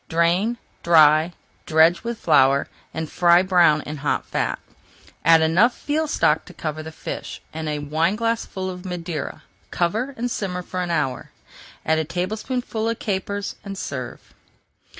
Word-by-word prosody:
Drain, 175 +8 +2 0.2
dry, 155 0 +5 0.4
dredge 160 +2 +4
with 235 0 -3
flour, 140 -5 +4 0.2
and 160 0 -4
fry 175 +2 +4
brown 175 -5 +4
in 150 +1 -6
hot 145 +1 -1
fat. - - -1 0.7
Add 165 0 +6
enough 185 +10 +3
veal 310 +2 0
stock - - +2
to - - -14
cover 155 -1 -4
the 160 0 -8
fish, - - -6
and 160 0 -4
a 150 - -1
wineglassful 185 +7 -1
of 180 -1 -6
Madeira; 170 -5 -5 0.3
cover 225 +11 -1
and 245 +1 -2
simmer 180 -4 -3
for 185 +1 -4
an 180 - -3
hour. 150 -6 -1 0.6
Add 160 0 +2
a - - +1
tablespoonful 220 - -3
of 230 - -2
capers 200 -1 -3
and 195 -1 -7
serve. 130 -8 -6
175 Hz, 150 wpm, -22 LUFS, 155-205 Hz, 0.7 s, Add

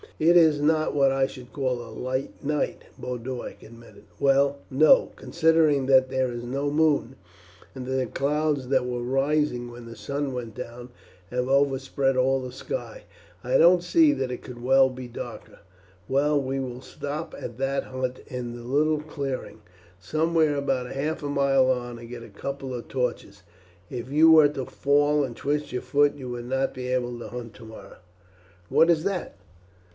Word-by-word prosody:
"It 165 +3 +4
is 160 -3 +5
not 155 +1 +2
what 135 -2 +4
I 135 0 +2
should 125 -2 -10
call 130 -3 -1
a 120 - -10
light 130 +4 -4
night," 150 +1 -2
Boduoc 125 0 -6
admitted. 115 +1 -15 0.2
"Well, 140 0 +3
no, 145 +4 +5
considering 160 -5 +2
that 130 -1 +5
there 130 -1 0
is 120 0 -6
no 135 +4 -2
moon, 150 -4 +2 0.6
and 130 -1 -7
that 130 - -5
the 130 -1 +1
clouds 145 -1 0
that 130 -2 +2
were 125 -1 -3
rising 135 -1 0
when 120 0 -11
the 115 0 -10
sun 140 +6 -3
went 115 -3 -6
down 120 0 -8 0.4
have 125 0 -1
overspread 135 -1 +1
all 135 +1 +3
the 130 -1 -6
sky. - - -6 0.4
I - - +2
don't 175 +1 +6
see 310 - +5
that 130 -1 -2
it 125 - -6
could 120 -1 -9
well 135 +1 +5
be 130 -1 -8
darker." 120 - -9 0.5
"Well 145 +2 +2
we 135 0 -2
will 125 -1 -5
stop 145 +4 -6
at - - -7
that 135 +1 -1
hut 130 -1 -4
in 120 -2 -5
the 120 - -9
little 150 +4 +1
clearing, 140 -4 -5 0.4
somewhere 155 - +1
about 135 -3 -1
half 150 +4 -2
a 145 - -3
mile 135 -2 +3
on, 120 -2 -2
and 115 0 -11
get 120 -1 -8
a 115 - -12
couple 135 +5 -6
of 120 -1 -6
torches. 115 -6 -3 0.5
If 125 +1 -6
you 160 +3 +6
were 155 -2 +7
to 135 -3 -5
fall 145 +2 +2
and 125 -4 -4
twist 145 +4 -2
your 125 - -3
foot 145 0 +2
you 130 -3 -7
would 120 -1 -5
not 135 +2 -1
be 125 -1 -6
able 125 -1 -1
to - - -7
hunt 120 -2 -7
tomorrow." 110 +1 -12 0.7
"What 165 - +4
is 160 -2 +1
that?" 195 -2 -3
135 Hz, 180 wpm, -25 LUFS, 125-145 Hz, 0.7 s, were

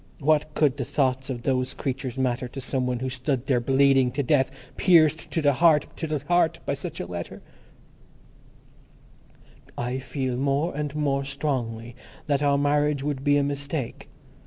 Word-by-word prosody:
What 155 0 +1
could 145 -3 +2
the 135 - -2
thoughts 130 0 0
of 120 -3 -4
those 130 -1 0
creatures 135 -2 -3
matter 125 -1 0
to 130 +3 -8
some 130 -1 -1
one 125 -1 -1
who 130 - -1
stood 130 0 -2
there 130 -3 +2
bleeding 135 0 +3
to 145 - -1
death, 135 0 +2 0.3
pierced 160 -4 +4
to 165 - -1
the 145 -1 +4
heart, 155 +1 +4
to 160 - -3
the 155 -1 -1
heart, 170 -2 +2
by - - 0
such 155 +4 -6
a - - -3
letter—... 85 0 -7 2.3
"I 125 +2 -2
feel 130 -2 -3
more 140 +5 0
and 150 -1 -3
more 140 -2 0
strongly 125 -5 -3 0.3
that 140 -1 +1
our 140 -1 +3
marriage 145 0 +1
would 140 -2 -3
be 145 0 +4
a 145 - +2
mistake. 140 -2 -4
140 Hz, 170 wpm, -25 LUFS, 130-150 Hz, 2.3 s, pierced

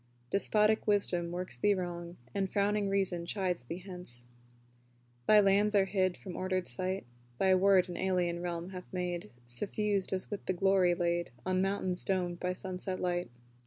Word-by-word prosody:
Despotic 210 +2 +4
Wisdom 185 -4 +2
works 175 -8 0
thee 205 +11 +2
wrong 175 -1 -6 0.2
And 195 -1 -1
frowning 205 +1 0
Reason 185 -3 0
chides 180 - -2
thee 175 +8 -7
hence, 180 -11 -3 1.0
Thy 215 - +7
lands 205 +1 +3
are 195 -1 +4
hid 185 -1 -1
from 185 -3 -9
ordered 185 -1 -2
sight: 185 +1 +1 0.3
Thy 190 +5 +3
word 190 0 +4
an 175 - -7
alien 180 -2 -1
realm 175 +1 -5
hath 180 -1 -10
made, 180 -1 -4 0.2
Suffused 195 - +2
as 190 +2 0
with 205 - -5
the 185 - +1
glory 185 -1 +2
laid 175 0 -1 0.2
On 185 0 0
mountains 190 -2 -1
domed 180 -2 -2
by 180 - -2
sunset 185 0 -4
light. 175 -3 -2
185 Hz, 160 wpm, -31 LUFS, 175-195 Hz, 1.0 s, Thy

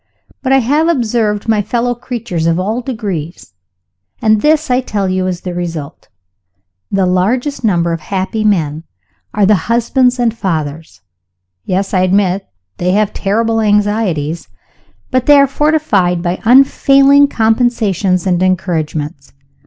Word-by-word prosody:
But 265 - -1
I 270 - +5
have 290 +6 +1
observed 225 -8 0
my 220 -2 +2
fellow 240 +3 -1
creatures 235 -9 -4
of 165 +1 +1
all 215 +6 -2
degrees 195 - -6 0.7
and 215 -1 +2
this, 310 -2 +1
I 250 +1 +2
tell 205 -6 -2
you, 185 0 -1
is 180 -1 -4
the 180 - -5
result. 170 -4 -6 0.8
The 195 -1 +1
largest 245 +10 -1
number 170 -5 +1
of 165 - -3
happy 195 +6 -3
men 160 -7 0 0.5
are 205 -1 +1
the 195 -2 +1
husbands 245 +2 +2
and 235 -2 0
fathers. 160 -6 -4 0.6
Yes; 190 +2 -2
I 185 - +2
admit 185 +1 +1 0.4
that - - -6
they 180 - +2
have 210 0 +1
terrible 225 +3 0
anxieties 205 -7 0 0.6
but 255 -1 0
they 290 - +7
are 280 - +6
fortified 270 - 0
by 175 +1 -2
unfailing 275 +3 +5
compensations 220 - 0
and 180 -2 0
encouragements. 160 -6 -2
205 Hz, 140 wpm, -14 LUFS, 180-245 Hz, 0.8 s, they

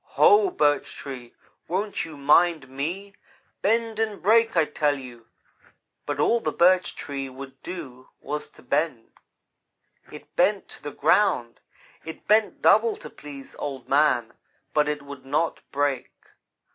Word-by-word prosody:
"'Ho! 415 -3 +5
Birch 145 - +1
Tree, 125 -4 -8 0.3
won't 195 +3 -2
you 160 -3 -10
mind 150 +1 +3
me? 170 +10 -5 0.5
Bend 225 +1 +1
and 215 -3 -1
break! 225 0 +3
I 165 - +5
tell 145 -1 0
you,' 120 -3 -11 0.8
but - - -2
all 235 - +3
the - - -2
Birch 180 +1 +3
Tree 135 -1 -5
would 135 0 -11
do 135 -8 -8
was 150 +1 -4
to - - -18
bend. 140 -2 -1 1.0
"It - - -13
bent 195 +3 +2
to - - -10
the 145 - -5
ground; 140 - +2 0.4
it 160 - -9
bent 215 0 +2
double 225 +1 +5
to 150 - -10
please 140 -2 -11
Old 135 -3 -5
man, 130 -5 +2 0.4
but 150 -1 +2
it 150 -1 -3
would 140 -2 -10
not 150 +5 -1
break. 145 -1 -1
150 Hz, 145 wpm, -25 LUFS, 135-195 Hz, 1.0 s, Ho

